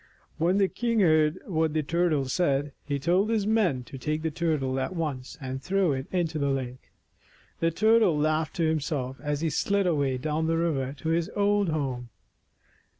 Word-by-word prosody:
When 175 +4 +2
the 195 -1 +4
king 230 +1 0
heard 155 -3 +4
what 160 -4 0
the 155 - +1
Turtle 160 -2 +1
said, 140 0 0
he 145 -1 -2
told 180 +9 +1
his 220 -3 +1
men 200 - +1
to 135 +1 -10
take 155 +3 -2
the 160 - -1
Turtle 145 -5 -1
at 160 +8 -3
once 145 -6 -4
and 130 -1 -5
throw 190 0 +1
it 135 0 -3
into 165 -4 -1
the 140 -1 +1
lake. 130 -2 -4 0.7
The 165 - +2
Turtle 215 -1 +3
laughed 155 +1 0
to 165 -2 +1
himself 145 -4 -2
as 145 0 -2
he 165 -1 0
slid 200 +5 +1
away 140 -6 +1
down 155 +4 -1
the 165 0 +1
river 140 -6 -1
to 160 +4 -4
his 165 0 +1
old 205 -2 +2
home. 130 -6 -2
155 Hz, 185 wpm, -27 LUFS, 140-175 Hz, 0.7 s, the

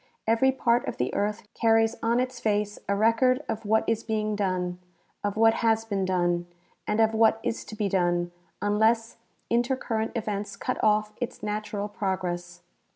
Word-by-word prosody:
Every 230 +4 +4
part 245 -2 +1
of - - -4
the 125 - -1
earth 210 +2 -1
carries 225 0 +3
on 230 +1 +2
its 255 -1 -2
face 210 -2 0
a 200 - +2
record 230 +6 +3
of 220 -1 -4
what 220 +1 +3
is 225 0 0
being 215 -1 -1
done, 180 -3 -1 0.4
of 205 -1 -1
Avhat 225 +1 +5
has 225 -1 +1
been 200 -3 -1
done, 175 -2 0 0.4
and 210 +1 0
of 220 0 +4
what 220 0 +4
is 230 - -2
to 215 - -8
be 210 -1 0
clone, 175 -2 +1 0.3
unless 220 +3 +2 0.3
intercurrent 235 -1 0
events 205 -2 -3
cut 255 +5 -3
off 215 0 +2
its 245 - -4
natural 210 -1 -3
progress. 180 -3 -3
215 Hz, 165 wpm, -27 LUFS, 200-225 Hz, 0.4 s, Avhat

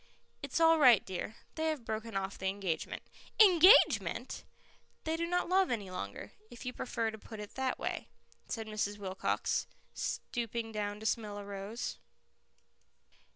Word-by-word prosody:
"It's 280 +2 -2
all 325 -1 +6
right, 250 -7 +7
dear. 190 +3 -5 0.2
They 320 0 -1
have 305 -7 -2
broken 220 -1 -3
off 195 0 -4
the 190 - -2
engagement." 190 -5 -2 0.4
"Engagement 380 0 +6 0.3
!" - - -36
"They 320 0 -1
do 335 +1 -1
not 355 +1 0
love 375 +1 +3
any 205 -6 -2
longer, 100 - -6 0.2
if 240 0 -11
you 250 - -3
prefer 230 -2 -3
it 220 -1 -9
put 210 -2 -9
that 265 -1 -1
way," - - -4 0.4
said 225 -2 -4
Mrs. 210 -1 -2
Wilcox, 190 -2 -1 0.3
stooping 230 -1 -3
down 205 -1 -3
to - - -8
smell 215 -2 -1
a 205 - -7
rose. 200 +4 -5
220 Hz, 155 wpm, -33 LUFS, 205-280 Hz, 0.4 s, right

